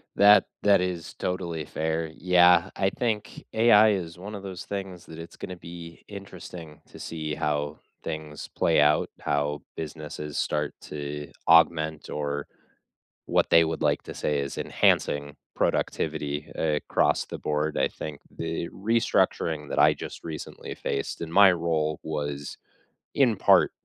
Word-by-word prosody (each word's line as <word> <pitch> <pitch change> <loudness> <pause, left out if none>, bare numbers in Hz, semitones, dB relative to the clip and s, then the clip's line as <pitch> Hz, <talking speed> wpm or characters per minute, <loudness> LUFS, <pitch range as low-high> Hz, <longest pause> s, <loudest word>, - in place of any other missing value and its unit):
That 100 -1 +7 0.2
that 100 -2 +5
is 90 -3 -3
totally 85 -4 -3
fair, 80 +2 -2
yeah, 90 0 +5
I 95 0 +1
think 110 -4 -3
AI 110 -1 +6
is 85 -4 -4
one 105 +3 -7
of 100 - -8
those 95 -2 -6
things 95 -3 -6
that 80 - -10
it's 80 0 -9
gonna 90 - -6
be 85 -1 -10
interesting 90 -5 -10
to - - -13
see 80 -2 -4
how 75 -1 -2 0.2
things 75 -1 -6
play 80 - +3
out, 75 0 +3
how 75 0 -1
businesses 75 -2 -6
start 75 -1 -1
to 75 0 -6 0.2
augment 80 -2 +4
or 75 -1 -3 0.8
what - - +2
they 85 0 +7
would 80 0 -3
like 75 -1 +2
to - - -8
say 75 -1 0
is 70 0 -4
enhancing 75 -1 +1 0.2
productivity 75 -2 -1
across 75 -2 +1
the - - -7
board, 75 0 -1
I - - +3
think 75 -2 -7 0.2
the 80 +1 -3
restructuring 95 -8 0
that - - -1
I - - +6
just - - -8
recently 80 -2 -7
faced, 70 - -3
in 80 -1 -5
my 100 +2 +8
role 80 -3 0
was, 75 -2 -4 0.6
in 125 -6 +4
part, - - +5
80 Hz, 145 wpm, -26 LUFS, 75-90 Hz, 0.8 s, my